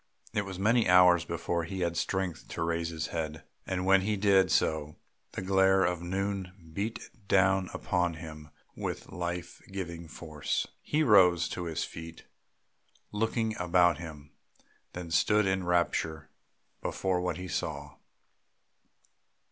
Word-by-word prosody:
It 105 -1 0
was 95 -2 -6
many 115 +3 +3
hours 90 -1 +6
before 85 0 -2
he 95 +3 -5
had 85 -1 0
strength 90 -1 -2
to - - -3
raise 85 0 -1
his 80 -2 -4
head; 80 -2 -3 0.2
and 90 0 -1
when 95 0 +5
he 105 +2 0
did 95 -2 +4
so, 75 -1 +1 0.4
the - - -4
glare 95 0 +4
of 90 -1 -1
noon 95 -1 -4
beat 105 +6 -4 0.2
down 95 -1 +3
upon 90 -2 0
him 75 -1 -9 0.3
with - - -5
life 85 0 -4
giving 85 -3 -5
force. 75 -1 -3 0.2
He 155 +1 +1
rose 90 - +5
to 90 - -4
his 80 -3 -2
feet 80 0 -8 0.9
looking 110 +1 0
about 90 -1 +3
him, 75 -3 -9 0.6
then 90 -2 -7
stood 105 +4 +3
in 95 -1 0
rapture 80 -2 0 0.5
before 95 -2 -1
what 90 - -2
he 90 0 -6
saw. - - -4
90 Hz, 140 wpm, -30 LUFS, 85-95 Hz, 0.9 s, hours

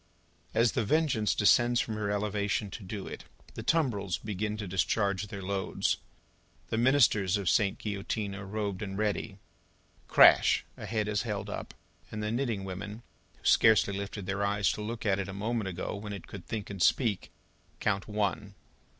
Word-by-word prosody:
As 115 -1 +4
The 120 - 0
Vengeance 120 -3 +2
descends 120 +3 +4
from 110 - -1
her 105 -1 -2
elevation 100 0 -1
to 105 - -7
do 100 +1 -6
it, - - -8 0.3
the - - -6
tumbrils 105 - +1
begin 105 +1 -3
to 105 -2 -5
discharge 100 +2 0
their 100 -2 -7
loads. 95 0 -1 0.7
The 110 - 0
ministers 115 -7 +4
of 100 -3 -4
Sainte 100 +2 +3
Guillotine 100 0 -3
are 100 0 -7
robed 105 -1 -3
and 95 -2 -4
ready. 105 -1 -1 0.7
Crash! - - +6
A - - -8
head 110 -2 -1
is 105 -1 0
held 105 -3 -4
up, - - -6 0.4
and 105 0 -4
the 105 - -1
knitting 115 -5 -1
women 100 +4 -6 0.3
who - - -23
scarcely 110 -2 +5
lifted 100 0 -5
their 100 +1 -1
eyes 100 0 +2
to - - -5
look 110 +2 -5
at 100 -2 +2
it 100 - -2
a - - -5
moment 110 +1 -2
ago 90 +2 -4
when 105 0 -6
it 100 - -7
could 95 -4 -10
think 105 -3 -4
and 95 -3 -6
speak, 110 0 +2 0.5
count 100 -2 0
One. 105 -1 -2
105 Hz, 175 wpm, -30 LUFS, 100-110 Hz, 0.7 s, Crash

